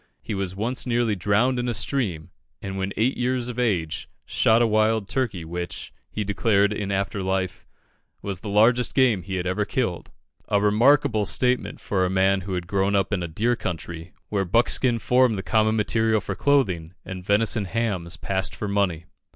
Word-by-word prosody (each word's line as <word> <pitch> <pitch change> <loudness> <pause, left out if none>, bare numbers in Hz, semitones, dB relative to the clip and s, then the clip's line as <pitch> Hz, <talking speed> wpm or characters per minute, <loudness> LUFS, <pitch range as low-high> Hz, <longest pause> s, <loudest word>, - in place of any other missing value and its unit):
He 110 - -4
was 95 -2 -3
once 120 +6 -1
nearly 120 -3 +1
drowned 110 +7 +1
in 120 0 -1
a 120 - -1
stream, 100 - -1 0.3
and 95 0 -6
when 95 0 -2
eight 120 +5 +1
years 125 0 -1
of 125 0 -5
age 90 -10 -1 0.2
shot 110 +1 +3
a 120 - +4
wild 110 -1 +2
turkey, 105 -11 -2
which, 85 +2 -6 0.2
he 105 - -3
declared 105 0 +2
in 100 -1 -3
after 100 +1 -1
life, 95 -1 -2 0.6
was 100 -3 -4
the 105 - -7
largest 115 +4 +3
game 125 -8 +3
he 95 +2 -5
had 90 -1 -2
ever 95 +3 0
killed 105 -6 -2 0.4
a 100 - +2
remarkable 110 +2 +3
statement 125 0 0
for 95 -2 -1
a 90 - +1
man 95 +1 +2
who 95 0 -4
had 90 -1 -3
grown 100 +2 0
up 100 +1 +1
in 95 - 0
a 85 - -3
deer 115 +9 0
country, 85 -3 -6 0.2
where 100 -2 0
buck 115 +6 +2
skin 125 -3 +2
formed 125 -1 +2
the 95 - -4
common 110 0 +2
material 110 +1 +1
for 100 - -4
clothing, 95 - +1
and 95 -1 -7
venison 105 +2 +2
hams 95 -5 -2
passed 95 -1 -2
for 105 - -4
money. 100 -5 0
105 Hz, 190 wpm, -24 LUFS, 95-115 Hz, 0.6 s, a